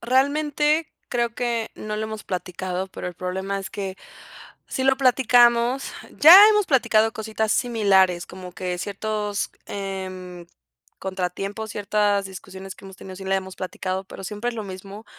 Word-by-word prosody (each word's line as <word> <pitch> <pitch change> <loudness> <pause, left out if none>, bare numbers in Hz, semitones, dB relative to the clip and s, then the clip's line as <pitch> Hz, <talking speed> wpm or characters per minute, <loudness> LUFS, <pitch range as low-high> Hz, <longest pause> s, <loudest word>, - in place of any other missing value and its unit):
realmente, 295 +5 +2 0.2
creo 235 -1 -1
que, 235 -2 -1
no 210 0 -5
lo 215 - -2
hemos 220 -1 -6
platicado, 180 +1 -4
pero 185 - -7
el 180 - -9
problema 190 +2 -3
es 195 -1 -6
que, 195 -2 -5 0.7
sí 260 - -2
lo 265 0 +4
platicamos 245 -1 +4 0.3
ya 325 +5 +11
hemos 420 -2 +3
platicado 225 -5 +3
cositas 220 0 -2
similares, 190 -7 +3
como 185 0 -9
que 180 0 -4
ciertos, 210 +1 -3 0.2
em, 185 -3 -6 0.5
contratiempos, 195 +3 -4
ciertas 205 -1 +1
discusiones 190 0 -9
que - - -16
hemos 190 -1 -11
tenido, 190 0 -10
si 190 - -9
las 195 0 +1
hemos 190 0 -8
platicado, 185 0 -4
pero 195 0 -10
siempre 210 +4 -4
es 235 - -9
lo 215 - -4
mismo. 195 +2 -9
200 Hz, 155 wpm, -23 LUFS, 190-235 Hz, 0.7 s, ya